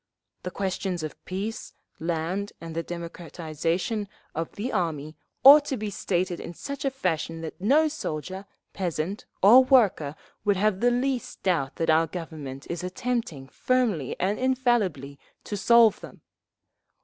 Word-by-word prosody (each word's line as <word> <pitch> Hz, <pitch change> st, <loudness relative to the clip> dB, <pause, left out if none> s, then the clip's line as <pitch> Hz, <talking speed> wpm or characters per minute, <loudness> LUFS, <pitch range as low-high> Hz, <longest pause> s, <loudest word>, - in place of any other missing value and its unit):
The 180 Hz, -, -4 dB
questions 190 Hz, -2 st, -3 dB
of 155 Hz, -, -7 dB
peace, 200 Hz, +4 st, -5 dB, 0.3 s
land 170 Hz, +5 st, -2 dB
and 165 Hz, -1 st, -8 dB
the 165 Hz, -, 0 dB
democratization 170 Hz, +4 st, -3 dB, 0.3 s
of 165 Hz, +1 st, -3 dB
the 235 Hz, +6 st, -4 dB
army 160 Hz, -5 st, -2 dB, 0.3 s
ought 285 Hz, +3 st, +10 dB
to 270 Hz, -, -2 dB
be 210 Hz, -1 st, -4 dB
stated 180 Hz, -2 st, -1 dB
in 170 Hz, -, -8 dB
such 280 Hz, +8 st, -6 dB
a 275 Hz, -, +2 dB
fashion 165 Hz, -, -2 dB
that 165 Hz, +2 st, -7 dB
no 290 Hz, +10 st, +4 dB
soldier, 190 Hz, -, -5 dB, 0.3 s
peasant 180 Hz, +1 st, -3 dB, 0.2 s
or 240 Hz, +7 st, +9 dB
worker 210 Hz, -, +3 dB, 0.3 s
would 205 Hz, -2 st, +2 dB
have 200 Hz, -1 st, +1 dB
the 245 Hz, -, +4 dB
least 250 Hz, 0 st, -2 dB
doubt 160 Hz, -8 st, 0 dB
that 165 Hz, -1 st, +1 dB
our 160 Hz, +1 st, +4 dB
Government 150 Hz, -6 st, -7 dB
is 170 Hz, 0 st, -4 dB
attempting, 185 Hz, -, -3 dB
firmly 225 Hz, -, 0 dB
and 195 Hz, +3 st, 0 dB
infallibly, 235 Hz, -, 0 dB, 0.2 s
to 210 Hz, -, -4 dB
solve 225 Hz, 0 st, +5 dB
them…. -, -, -12 dB
185 Hz, 145 wpm, -26 LUFS, 165-230 Hz, 0.3 s, ought